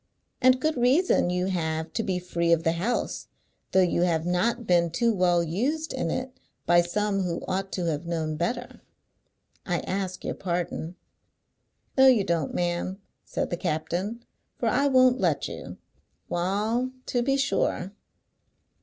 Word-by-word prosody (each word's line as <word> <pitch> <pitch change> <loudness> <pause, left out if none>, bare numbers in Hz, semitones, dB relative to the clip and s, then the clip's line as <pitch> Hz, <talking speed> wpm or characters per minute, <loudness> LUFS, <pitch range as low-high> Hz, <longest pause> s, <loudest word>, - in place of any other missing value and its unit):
"And 255 0 +5
good 310 +1 0
reason 255 - +3
you 180 0 0
have 160 -3 -2
to 225 - 0
be 190 -4 -1
free 170 -1 -1
of 165 -1 +3
the 165 - +3
house, 190 +9 -2 0.4
though 190 - +5
you 175 -1 +1
have 165 -2 +1
not 225 +7 0
been 175 -3 +3
too 230 +7 +1
well 175 -3 +3
used 265 - -1
in 265 - -2
it 255 0 -3 0.3
by 175 0 +5
some 200 +3 -1
who 175 -2 -2
ought 190 +1 -2
to 180 - -2
have 165 0 -2
known 160 -2 -2
better. 240 +10 -3 0.8
I - - -1
ask 190 -1 -3
your - - -1
pardon." 175 -1 -3 1.0
"No 265 - +8
you 245 -6 +5
don't, 165 -5 -1
ma'am," 175 +2 -2 0.3
said - - -3
the 175 - -1
captain, 180 +7 -2 0.3
"for 235 - -1
I 280 +6 +2
won't 255 -1 +5
let - - +1
you. - - -8 0.5
Wa'al, 210 +8 0 0.2
to 245 - 0
be 270 +2 +1
sure!" 200 -8 0
185 Hz, 155 wpm, -26 LUFS, 170-240 Hz, 1.0 s, No